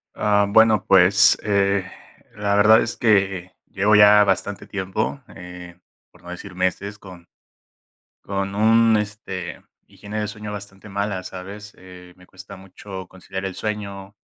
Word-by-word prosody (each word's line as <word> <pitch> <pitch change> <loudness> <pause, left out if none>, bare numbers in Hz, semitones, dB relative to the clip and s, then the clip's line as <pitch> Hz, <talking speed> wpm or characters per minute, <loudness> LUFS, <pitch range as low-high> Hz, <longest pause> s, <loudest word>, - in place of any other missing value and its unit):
Ah 105 -1 +2
bueno, 110 -1 +4
pues, 95 +1 +5
eh, 100 -2 0 0.5
la 105 -1 -1
verdad 105 +2 +6
es 115 - -5
que 95 -5 +1 0.2
llevo 105 +2 +2
ya 105 0 +7
bastante 100 0 -2
tiempo, 100 +7 -3 0.2
eh, 90 -1 -11 0.4
por 90 - -22
no 90 - -13
decir 90 +2 -9
meses 95 +3 -3
con 90 -4 -14 0.9
con 100 0 -4
un, 115 +2 +4
este, 105 -3 -6 0.3
higiene 105 +1 -7
de 105 - -3
sueño 105 -1 -8
bastante 100 0 -10
mala, 100 -2 -3
¿sabes?, 100 +3 -10
eh, 90 -1 -14
me 90 - -19
cuesta 95 +2 -13
mucho 95 0 -10
conciliar 95 +1 -8
el 95 - -6
sueño, 100 -2 -6
100 Hz, 145 wpm, -21 LUFS, 95-105 Hz, 0.9 s, ya